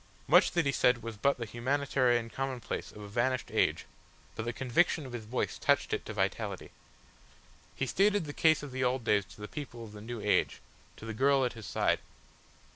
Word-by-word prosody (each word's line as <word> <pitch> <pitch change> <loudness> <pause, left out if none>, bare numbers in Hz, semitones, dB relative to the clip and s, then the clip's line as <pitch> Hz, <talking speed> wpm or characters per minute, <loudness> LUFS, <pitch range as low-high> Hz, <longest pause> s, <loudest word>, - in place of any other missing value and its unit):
Much - - +5
that 175 -3 +2
he 140 - +2
said 125 -3 +2
was 115 -1 -5
but 140 +7 +2
the 120 - -4
humanitarian 125 0 +1
commonplace 130 0 -4
of 105 - -11
a - - -8
vanished 120 +4 -1
age, - - +1 0.5
but 110 - -4
the 120 - -1
conviction 135 +6 +1
of 130 - -9
his 115 -3 -5
voice 120 +4 -2
touched - - +2
it - - -1
to - - -4
vitality. - - -2 1.0
He - - -1
stated 200 +5 +2
the 145 - -6
case 155 -1 +3
of 145 - -7
the 130 0 -2
old 125 0 +1
days 105 -3 +2
to 105 - -15
the 105 - -5
people 130 -5 -7
of 110 - -10
the 105 0 -10
new 120 +2 -6
age, 105 0 +1 0.4
to - - -10
the 115 - -4
girl 135 +3 +3
at 125 - -2
his 110 -5 -9
side. - - +1
125 Hz, 205 wpm, -31 LUFS, 115-140 Hz, 1.0 s, Much